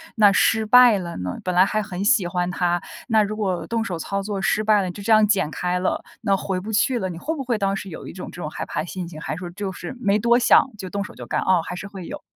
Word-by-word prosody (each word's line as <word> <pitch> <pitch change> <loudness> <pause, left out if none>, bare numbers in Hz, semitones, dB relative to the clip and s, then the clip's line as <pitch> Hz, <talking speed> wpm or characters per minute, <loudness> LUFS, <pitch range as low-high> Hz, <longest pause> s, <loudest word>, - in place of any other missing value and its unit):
那 210 -3 +6
失 220 +2 +3
败 245 0 +7
了 170 -2 -6
呢？ 90 0 -4
本 180 - -1
来 185 +1 +6
还 215 +2 0
很 195 -2 -5
喜 205 -5 +3
欢 175 0 -1
它， 175 0 0 0.3
那 220 -3 +4
如 210 +1 -3
果 190 -5 -1
动 230 -1 -1
手 175 - -3
操 195 +4 -3
作 200 -1 -4
失 215 +2 +1
败 215 -1 +4
了， 185 -2 -3
就 200 - -10
这 225 - 0
样 215 -1 +6
剪 195 -7 +1
开 180 +1 -1
了， 185 - -1 0.2
那 200 -3 +2
回 190 -1 -2
不 210 +4 -6
去 240 +4 +2
了， 190 - -2
你 170 - -7
会 300 - -3
不 275 - -4
会 240 -3 -1
当 195 -1 0
时 195 0 -6
有 160 - -9
一 - - -7
种 185 - -8
这 175 - -9
种 150 - -4
害 - - -5
怕 - - -3
心 180 +1 -6
情？ 170 - -11
还 - - -4
是 - - -8
说 180 -1 -6
就 195 +1 -4
是 180 +6 -7
没 205 -3 +2
多 235 +2 +4
想， 255 - +5
就 190 -2 -7
动 200 +2 -3
手 205 - -10
就 - - -9
干？ - - -1
哦， 185 -2 +3
还 180 - -5
是 195 - -7
会 195 -3 -9
有。 - - -7
195 Hz, 320 characters per minute, -22 LUFS, 180-215 Hz, 0.3 s, 败